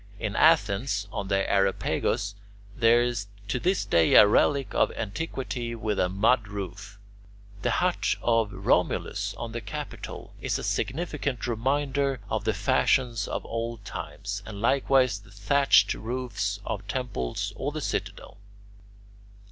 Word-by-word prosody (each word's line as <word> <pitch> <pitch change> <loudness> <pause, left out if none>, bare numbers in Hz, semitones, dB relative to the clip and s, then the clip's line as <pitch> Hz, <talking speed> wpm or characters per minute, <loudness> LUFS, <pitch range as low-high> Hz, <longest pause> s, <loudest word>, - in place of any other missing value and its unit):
In 110 -3 -3
Athens 105 -9 +3
on 100 - -4
the 95 0 +1
Areopagus 100 +1 +1 0.4
there 120 0 +5
is 120 -4 -2 0.2
to 120 +4 -1
this 185 +7 +1
day 85 -1 +4
a - - +10
relic 135 +6 +2
of - - +2
antiquity 120 +1 -4
with 110 -2 -2
a 90 - +2
mud 110 +5 +2
roof. 100 0 -7 0.6
The - - 0
hut - - +1
of 115 -3 +2
Romulus - - 0
on 115 -1 -6
the 120 +1 -4
Capitol 100 - -7
is - - 0
a - - -6
significant 140 -5 -2
reminder 135 +3 0
of 110 -1 -1
the 110 - +2
fashions 120 +1 +2
of - - -4
old 115 -2 -4
times, 100 +1 -5
and 100 -1 -8
likewise 130 -1 +3
the 105 +2 -18
thatched 120 +8 +3
roofs 110 -4 -3
of 105 -2 -4
temples 100 - -3
or - - -3
the - - -4
Citadel. - - -4
115 Hz, 140 wpm, -27 LUFS, 100-130 Hz, 0.6 s, a